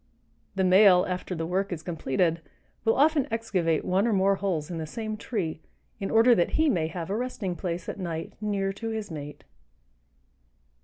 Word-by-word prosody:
The 190 - +1
male, 185 -1 +6
after 180 0 -3
the 165 0 -3
work 190 +3 -1
is 165 -2 -4
completed, 165 0 0 0.4
will 225 - +3
often 295 -1 +3
excavate 185 -8 0
one 195 +5 +2
or 230 - +2
more 195 0 +3
holes 180 -6 -2
in 165 - -4
the 160 - -4
same 215 +5 -4
tree 195 -8 -3 0.4
in 195 - -3
order 230 +2 +6
that 175 -7 +1
he 315 0 +4
may 165 - +1
have 165 +2 -5
a - - 0
resting 225 -6 -3
place 175 -1 -4
at - - -5
night 165 -3 -4
near 200 -2 -1
to 225 +3 -5
his 220 -4 -4
mate. 150 -2 -7
190 Hz, 185 wpm, -27 LUFS, 170-215 Hz, 0.4 s, male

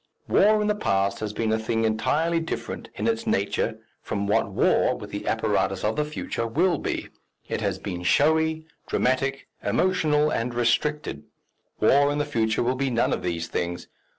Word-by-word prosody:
War 215 +1 +4
in - - 0
the 210 - +3
past 100 - 0
has 105 -1 -3
been 110 +1 -1
a 110 - +1
thing 115 0 0
entirely 155 +10 +1
different 165 - -5
in 105 - -3
its 115 0 0
nature 100 +1 0 0.2
from 100 - -3
what 100 - +1
war, - - +2
with - - -9
the - - -5
apparatus - - 0
of 110 +1 +1
the 150 - +1
future, 150 -6 -3
will 165 +8 +2
be - - -3 0.4
it - - -3
has - - -1
been 90 -3 -5
showy, 160 - +2 0.2
dramatic, 135 +2 0 0.2
emotional, 150 -5 +2
and 120 +1 -2
restricted; 150 +6 0 0.5
war 145 +1 +4
in 145 - -1
the 145 - 0
future 110 -7 0
will 125 +2 +1
be 135 +1 -1
none 120 -1 +1
of - - -2
these 85 -2 -2
things. 85 0 -3
125 Hz, 180 wpm, -25 LUFS, 110-150 Hz, 0.5 s, War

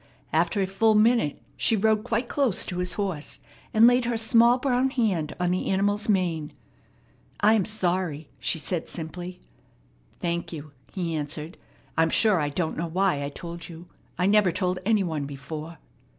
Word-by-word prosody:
After 200 -3 +2
a - - +1
full 215 +3 +2
minute 220 - +3 0.2
she 225 - +2
rode 215 0 +2
quite 235 0 -1
close 265 -8 +1
to 180 - -4
his 180 0 0
horse, 190 -8 -3 0.3
and 220 +1 +6
laid 245 0 +5
her 235 -1 0
small 235 +2 +5
brown 255 0 +1
hand 205 - -1
on 180 0 +1
the 185 - -1
animal's 205 +2 +1
mane. 170 -6 0 0.9
"I 215 - +6
am 210 -5 +2
sorry," 180 -7 -1
she 125 +6 +1
said 165 +1 -4
simply. 175 +2 -7 0.8
"Thank 170 0 -2
you," 150 -2 -8 0.2
he 175 -3 -3
answered. 150 +2 -4 0.4
"I'm 165 0 +4
sure 210 +1 +4
I 145 -1 0
don't 160 +2 -2
know 170 +2 -2
why 180 -3 +1
I 140 - -3
told 170 +3 -8
you. 170 +1 -11 0.3
I 180 - +1
never 200 -2 +4
told 185 0 -1
any 215 -3 +3
one 160 -5 -2
before." 155 +4 -7
180 Hz, 170 wpm, -26 LUFS, 165-215 Hz, 0.9 s, and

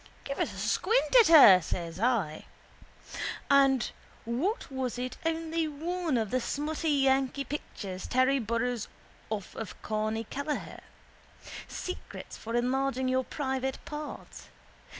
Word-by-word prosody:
—Give 275 - -5
us - - 0
a - - -10
squint 475 +5 +1
at 460 - +7
her, 270 - +9
says 170 0 -4
I. 210 -10 0 1.1
And 270 -3 +4 0.3
what 285 - -2
was 260 -2 -3
it 250 +1 -4
only 325 0 -1
one 325 0 -2
of 220 -3 -1
the 255 - +1
smutty 310 +5 -2
yankee 270 -1 +2
pictures 200 -9 -6
Terry 260 +2 +3
borrows 235 0 -1 0.4
off 210 -3 -4
of 225 - -7
Corny 215 +1 -1
Kelleher. 285 +6 -4 0.9
Secrets 365 - -7
for 230 +1 -5
enlarging 260 +1 +1
your 260 0 +2
private 265 -2 -2
parts. 300 0 -8
265 Hz, 125 wpm, -29 LUFS, 230-295 Hz, 1.1 s, her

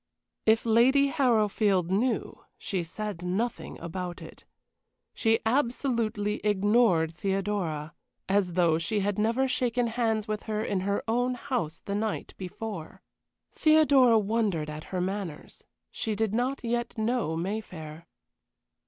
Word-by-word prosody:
If 220 +1 +4
Lady 260 +5 +4
Harrowfield 215 - +2
knew, 235 +6 -1
she 185 -4 -2
said 200 +2 -5
nothing 195 +7 -3
about 175 +1 -5
it. - - -12 0.7
She 225 0 +2
absolutely 230 -4 0
ignored 205 -5 +3
Theodora, 185 -5 -2 0.3
as 190 -2 +1
though 170 -2 +3
she 205 +5 -1
had 205 +1 -1
never 230 +5 +2
shaken 245 -1 0
hands 225 -2 0
with 215 -1 -2
her 215 0 -1
in 200 -3 -1
her 200 +2 -1
own 245 +2 +1
house 240 - -3
the 200 - -3
night 215 +1 -2
before. 185 -2 -7 0.5
Theodora 285 -7 +5
wondered 205 -8 0
at 150 +1 -7
her 185 -1 -3
manners 185 -4 -5 0.3
she 220 -2 -2
did 220 -1 0
not 255 +4 -1
yet 240 0 -2
know 220 -7 0
Mayfair. 170 -4 -5
210 Hz, 125 wpm, -28 LUFS, 185-235 Hz, 0.7 s, Theodora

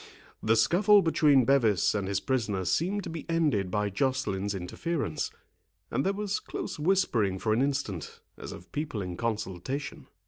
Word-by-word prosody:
The 110 +1 +3
scuffle 195 - +5
between 145 -5 +4
Bevis 115 -9 +3
and 100 -2 -1
his 100 - 0
prisoner 110 -8 -1
seemed 190 - 0
to - - -6
be 160 -2 -5
ended 150 - +1
by 105 +1 -1
Joceline's 100 -5 -1
interference, 95 - -3 0.6
and 135 - 0
there 195 - +2
was 205 0 -2
close - - -6
whispering 135 - +2
for 110 +3 0
an 115 - +2
instant, 135 - -2 0.2
as - - -8
of 90 - -11
people 145 -9 -3
in 90 -1 -5
consultation. 115 +4 -4
125 Hz, 160 wpm, -29 LUFS, 100-155 Hz, 0.6 s, scuffle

